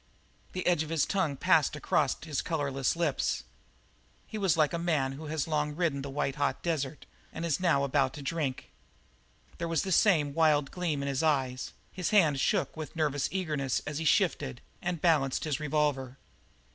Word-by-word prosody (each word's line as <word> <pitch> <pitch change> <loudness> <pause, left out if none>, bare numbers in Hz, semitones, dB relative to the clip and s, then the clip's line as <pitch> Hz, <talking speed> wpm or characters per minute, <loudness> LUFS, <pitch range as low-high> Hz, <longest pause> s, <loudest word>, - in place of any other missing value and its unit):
The 185 - -3
edge 175 -3 +3
of 160 - -4
his 160 -3 +2
tongue 175 -8 0
passed 160 -3 +3
across 150 -2 +1
his 150 -4 -1
colourless 140 -5 -1
lips. 155 - 0 0.8
He - - -9
was 190 -6 +2
like 155 +1 +3
a 170 - -1
man 155 -6 +1
who 150 +3 -8 0.2
long 150 -2 +1
has 150 - -8
ridden 160 -6 0
the 140 - -6
white 135 0 -2
hot 145 0 -1
desert 155 -4 -2 0.3
and 165 - -5
is 160 -4 0
now 165 -6 +3
about 135 -1 +1
to 145 - -8
drink. 145 -3 -3 0.9
There 170 - -2
was 165 -2 0
the 190 - -3
same 160 -7 +4
wild 150 -3 +3
gleam 165 -6 -2
in - - -3
his 135 0 0
eyes; 135 -5 0 0.2
his 180 -3 -2
hand 160 -10 +4
shook 195 +6 +1
with 155 -3 -7
nervous 145 -4 0
eagerness 150 -8 -1
as 150 0 -3
he 165 - -3
shifted 65 - +2 0.2
and 175 -1 -2
balanced 150 -6 +2
his 150 -2 -1
revolver. 145 -3 0
150 Hz, 185 wpm, -30 LUFS, 140-165 Hz, 0.9 s, same